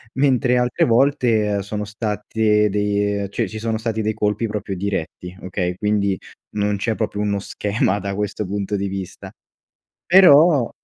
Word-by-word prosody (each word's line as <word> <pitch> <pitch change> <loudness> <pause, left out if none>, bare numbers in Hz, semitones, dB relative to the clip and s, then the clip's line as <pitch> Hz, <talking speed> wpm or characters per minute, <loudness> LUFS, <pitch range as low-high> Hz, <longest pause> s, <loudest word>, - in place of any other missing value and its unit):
mentre 130 -2 +2
altre 125 0 +1
volte, 120 -3 +2
ehm, 100 -1 0
sono 105 +1 -4
state 105 0 0
de 100 0 0
cioè, - - -2
ci 110 - -8
sono 110 0 -2
stati 110 -1 -2
dei 110 +1 -1
colpi 105 +1 -1
proprio 105 -2 -4
diretti, 90 -2 -4
okay. 90 -1 -3
Quindi 100 -1 0 0.3
non 105 -1 -1
c'è 110 +2 -1
proprio 105 -2 -3
uno 100 -1 0
schema 100 0 -1
da 100 0 -4
questo 105 +1 -3
punto 100 +1 -3
di 100 0 -2
vista. 95 -2 -7 0.7
Però, 160 -7 +6
105 Hz, 155 wpm, -20 LUFS, 100-115 Hz, 0.7 s, Però